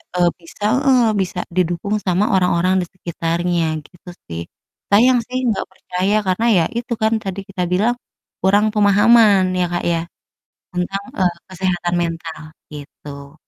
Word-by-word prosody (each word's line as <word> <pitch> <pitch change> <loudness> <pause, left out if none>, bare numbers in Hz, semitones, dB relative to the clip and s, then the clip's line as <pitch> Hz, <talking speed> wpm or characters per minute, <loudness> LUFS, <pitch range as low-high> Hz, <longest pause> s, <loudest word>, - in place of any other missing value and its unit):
eee, 175 -1 +4
bisa 170 +4 -13 0.2
heeh, 260 -3 +5 0.2
bisa 180 -1 -3 0.2
didukung 180 +3 0
sama 185 +2 +2
orang-orang 180 0 +2
di - - -3
sekitarnya, 170 -1 -1 0.2
gitu 175 0 -15 0.2
sih. 85 0 -5 0.5
Sayang 245 +5 +5
sih 255 +1 -3 0.2
gak - - -3
percaya, 190 +2 -2
karena 185 +5 +1
ya 170 - +4
itu 240 0 -3
kan 220 +1 +2
tadi 195 -1 -4
kita 185 -2 -3
bilang, 215 +6 +2 0.5
kurang 200 +3 +3
pemahaman 205 -2 +5
ya, 180 - +2
Kak, 175 - -1
ya, 165 -1 0 0.7
tentang, 180 +3 -2 0.2
eee, 180 -2 +2 0.2
kesehatan 180 -2 -1
mental, 165 -1 -4 0.3
gitu. 140 -1 -10
185 Hz, 140 wpm, -19 LUFS, 175-205 Hz, 0.7 s, heeh